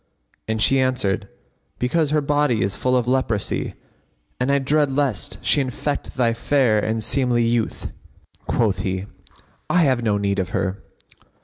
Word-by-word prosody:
and 110 -1 0
she 135 - +4
answered, 125 -7 0 0.5
"Because 145 +5 +1
her 150 0 +2
body 145 -7 +1
is 95 0 -1
full 125 +3 +1
of 120 -1 -1
leprosy 125 -5 -1 0.6
and 125 +2 +1
I 140 - +4
dread 145 +2 +2
lest 135 -6 -1
she 145 - +4
infect 135 +3 -4
thy 120 -2 +2
fair 115 -2 +2
and 110 +1 -1
seemly 120 -1 +2
youth." 115 -1 -1 0.6
Quoth 100 -5 +1
he, 95 0 -2 0.6
"I 180 -1 +4
have 130 -5 +2
no 105 -3 +1
need 100 -1 0
of 90 -1 -2
her." 95 +1 -2
125 Hz, 150 wpm, -22 LUFS, 105-140 Hz, 0.6 s, she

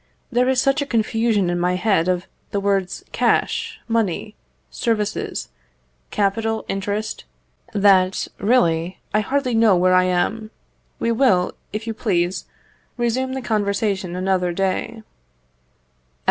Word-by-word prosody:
There 250 +1 +2
is 260 -1 +2
such 275 +2 +2
a 285 - -2
confusion 225 -5 +1
in 175 - -1
my 180 +1 +1
head 185 -3 +2
of 180 0 0 0.2
the 200 - -1
words 195 -2 -1
cash, - - 0
money, 220 -2 -1 0.4
services, 220 -4 -2 0.6
capital, 220 +2 0
interest, 205 +2 -3 0.5
that, 195 -2 +3
really, 180 -6 +2 0.2
I 210 - +4
hardly 260 +3 0
know 225 -3 +5
where 185 +1 +3
I 185 0 +5
am. 210 +5 0 0.5
We 230 - 0
will, 225 -7 +3 0.2
if 215 +2 -4
you 225 - -3
please, 185 -5 -1 0.5
resume 255 +2 0
the 265 -1 -4
conversation 200 -4 -1
another 185 -1 0
day. 195 +5 -2
205 Hz, 125 wpm, -21 LUFS, 185-230 Hz, 0.6 s, know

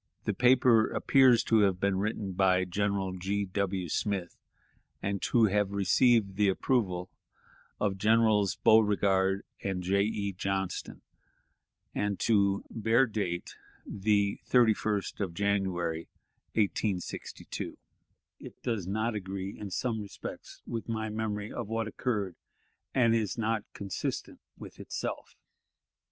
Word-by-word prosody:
The - - 0
paper 125 -3 +4
appears 130 -4 +4
to 115 - +3
have 95 -3 +3
been 100 -1 +1
written 105 -1 -2
by 95 0 +3
General 95 0 -1
G. 100 +2 -1
W. 95 -1 -2
Smith, 95 +1 -2 0.6
and 100 0 -2
to 120 - +3
have 105 -1 +1
received 100 +1 +3
the 105 -1 +4
approval 95 -4 0 0.7
of 95 -2 -1
Generals 110 -2 +3
Beauregard 100 -3 +3 0.2
and 95 -2 -2
J. 100 +2 +2
E. 100 -1 -1
Johnston, 95 0 -3 0.9
and 105 -3 -1
to 100 -3 +2
bear 115 +3 +3
date 100 -7 -3 0.3
the 100 0 +1
31st 110 -4 +2
of 95 -5 -3
January, 95 -5 -1 0.4
1862. 100 -3 -2 0.6
It - - -10
does 110 -7 -2
not 110 +4 -1
agree 95 -1 -5
in 105 - -7
some 110 +4 -2
respects 100 -2 -9
with 115 -1 -5
my 110 -1 -2
memory 105 -1 -3
of 120 -4 -4
what 115 0 -2
occurred, 105 -5 -2 0.6
and 115 -3 +4
is 110 -2 0
not 110 -1 -1
consistent 100 -3 -4 0.2
with - - -11
itself. - - -5
100 Hz, 120 wpm, -30 LUFS, 95-110 Hz, 0.9 s, paper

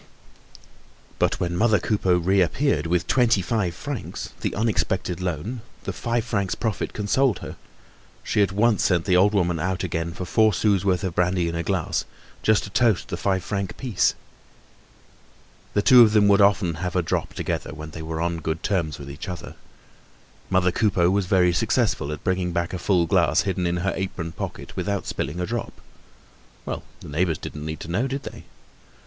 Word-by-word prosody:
But - - +1
when 85 -1 -1
mother 110 +3 +4
Coupeau 95 -4 +1
reappeared 95 - +1
with 85 +1 +1
twenty 115 -5 +3
five 95 -4 -1
francs, 140 +2 -6
the - - -2
unexpected 95 -4 -1
loan, 90 - -3 0.2
the - - -4
five 120 -1 -1
francs 100 -5 -1
profit 110 -4 -2
consoled 110 +2 +1
her; - - -7 0.7
she - - +1
at 100 -2 +2
once 105 +2 +2
sent 90 -3 +2
the 95 -2 +3
old 100 +3 +4
woman 85 -4 +1
out 95 +3 -1
again 85 -1 -2
for 90 +2 -6
four 110 +3 +3
sous' 100 -2 +2
worth 95 -2 +1
of 95 -3 -2
brandy 90 0 +1
in 85 - -3
a 85 - -1
glass, 90 -1 -1 0.4
just 110 -1 +3
to 100 - -8
toast 115 -3 +2
the - - -2
five 95 -2 0
franc 100 -1 -3
piece. 120 -8 +1 1.6
The 105 - +3
two 125 -1 +8
of 110 -2 +6
them 105 -2 +5
would 100 0 +5
often 100 -3 +3
have 90 0 -3
a 90 - +2
drop - - -2
together, - - -3
when 80 0 -8
they 80 - -7
were 80 0 -4
on 85 0 -1
good 80 0 -3
terms 85 -8 -1
with 70 - -9
each 70 +7 -7
other. 90 -3 -7 1.0
Mother 90 -1 +3
Coupeau 90 -3 +2
was 100 -1 +1
very 90 -2 +4
successful 75 -3 +1
at 75 - -6
bringing 90 -1 0
back 85 +1 -1
a 90 - -3
full 90 -3 +2
glass - - +3
hidden 95 -2 -1
in 85 +1 0
her 95 - +1
apron 95 -3 -4
pocket - - -7
without 100 -1 -2
spilling 75 +6 -3
a 90 - -1
drop. 120 +2 -4 0.9
Well, - - -4 0.2
the - - -10
neighbors 80 +1 0
didn't 75 +2 -7
need 80 0 -5
to - - -7
know, 115 +9 +1
did 135 +1 -4
they. - - -9
95 Hz, 190 wpm, -24 LUFS, 85-105 Hz, 1.6 s, two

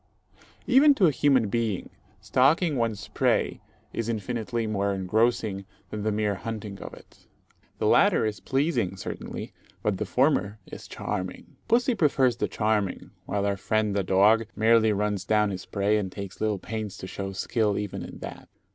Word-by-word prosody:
Even 280 +3 +6
to 200 - +4
a 160 - +5
human 130 -4 +3
being, 110 -2 -2 0.3
stalking 140 - +3
one's 110 -6 -2
prey - - +1 0.3
is 115 0 -2
infinitely 115 +1 -2
more 100 -2 0
engrossing 105 +1 0 0.3
than 105 - -4
the 110 +1 0
mere 105 -1 0
hunting 105 -1 -6
of - - -7
it. - - -19 0.5
The - - -2
latter - - +4
is 105 -2 -2
pleasing, 135 - 0
certainly, - - -6 0.3
but 100 -3 0
the 105 - -2
former 125 -6 +2
is - - -10
charming. 95 0 -5
Pussy 245 +2 +3
prefers 135 - +2
the - - 0
charming, 105 -3 -1 0.2
while 100 -1 -1
our 100 -1 0
friend 105 +2 0
the 100 - +2
dog 105 +4 +4
merely 110 0 +4
runs 105 -2 -1
down 105 -1 +2
his 95 -1 -6
prey, 105 +1 +1
and 95 -3 -4
takes 100 -1 -8
little 110 -2 +1
pains 105 0 -5
to - - -7
show 95 +1 -5
skill 105 +1 0
even 105 -2 -4
in - - -8
that. - - -8
105 Hz, 165 wpm, -26 LUFS, 100-115 Hz, 0.5 s, Even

